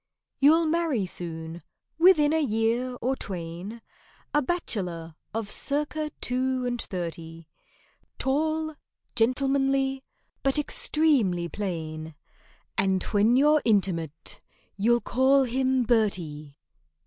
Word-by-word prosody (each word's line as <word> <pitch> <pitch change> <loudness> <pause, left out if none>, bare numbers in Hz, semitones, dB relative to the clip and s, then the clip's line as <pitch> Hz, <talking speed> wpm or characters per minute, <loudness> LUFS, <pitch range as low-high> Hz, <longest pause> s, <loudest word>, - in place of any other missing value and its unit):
You'll 320 +4 +5
marry 315 - +1
soon—within 175 - 0
a 320 - +2
year 235 0 0
or 260 +2 +1
twain— 185 +3 -6 0.5
A 295 - +4
bachelor 185 - -3 0.2
of 220 -2 -3
circa 300 +2 -1
two 255 0 0
and 245 -1 -1
thirty: 165 -2 -6 0.7
Tall, 315 +3 0 0.4
gentlemanly, 270 +2 +1 0.4
but 270 +1 +1
extremely 275 - +1
plain, 160 -5 -5 0.6
And 190 -1 +2
when 215 +4 +4
you're 300 +3 +5
intimate, 175 -8 0 0.3
you'll 235 +4 +3
call 270 +2 +3
him 260 +1 +1
"BERTIE." 175 - 0
240 Hz, 95 wpm, -27 LUFS, 180-275 Hz, 0.7 s, You'll